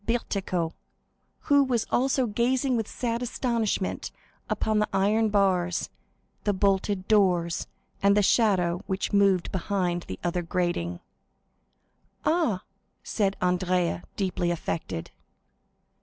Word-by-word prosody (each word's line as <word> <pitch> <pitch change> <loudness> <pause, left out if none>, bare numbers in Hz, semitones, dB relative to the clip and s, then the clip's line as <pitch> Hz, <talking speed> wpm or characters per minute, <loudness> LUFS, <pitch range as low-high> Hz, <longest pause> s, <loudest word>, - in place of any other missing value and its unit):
Bertuccio, 195 -7 -1 0.7
who 285 -1 +4
was 245 -4 0
also 265 +1 +2
gazing 245 +4 +1
with 225 -2 -1
sad 235 -1 -2
astonishment 235 -5 -1 0.4
upon 215 -1 +1
the 210 - +1
iron 215 +3 +2
bars, 185 -4 +1 0.5
the 205 - +1
bolted 195 0 +1
doors, 180 -5 +2 0.3
and 200 +1 +4
the 205 - +4
shadow 185 -5 +3
which 190 +1 -2
moved 195 -3 +3
behind 180 -2 -1
the 95 - -5
other 175 +1 0
grating. 170 - -2 1.2
"Ah," 310 - +1 0.4
said 200 -3 0
Andrea, 180 -1 +1
deeply 180 -3 -1
affected. 160 - -3
195 Hz, 110 wpm, -27 LUFS, 180-225 Hz, 1.2 s, who